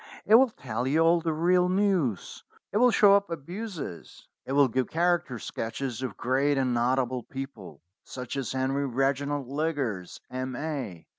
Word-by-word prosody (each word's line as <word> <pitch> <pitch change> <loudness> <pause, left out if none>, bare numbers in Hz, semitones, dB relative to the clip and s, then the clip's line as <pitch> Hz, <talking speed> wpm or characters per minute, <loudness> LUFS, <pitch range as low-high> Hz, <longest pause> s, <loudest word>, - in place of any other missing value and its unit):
It 210 - +3
will 255 +3 +7
tell 125 - -4
you 155 +4 +2
all 165 +1 +4
the 165 -1 -1
real 180 +3 +2
news. 185 - 0 0.3
It - - 0
will 250 +3 +6
show 205 -4 +6
up 200 -1 +1
abuses. 170 - -7 0.2
It 135 - -2
will 140 -1 +5
give 130 +1 -1
character 170 -6 +1
sketches 115 +2 -4
of 125 -6 -4
great 135 +3 +1
and 130 -2 +1
notable 125 +1 +1
people, 120 - -9 0.2
such 125 0 -7
as 135 -3 -3
Henry 135 +2 0
Reginald 135 +2 -1
Liggers, 140 - -3
M.A. 130 - -4
135 Hz, 155 wpm, -27 LUFS, 125-165 Hz, 0.3 s, will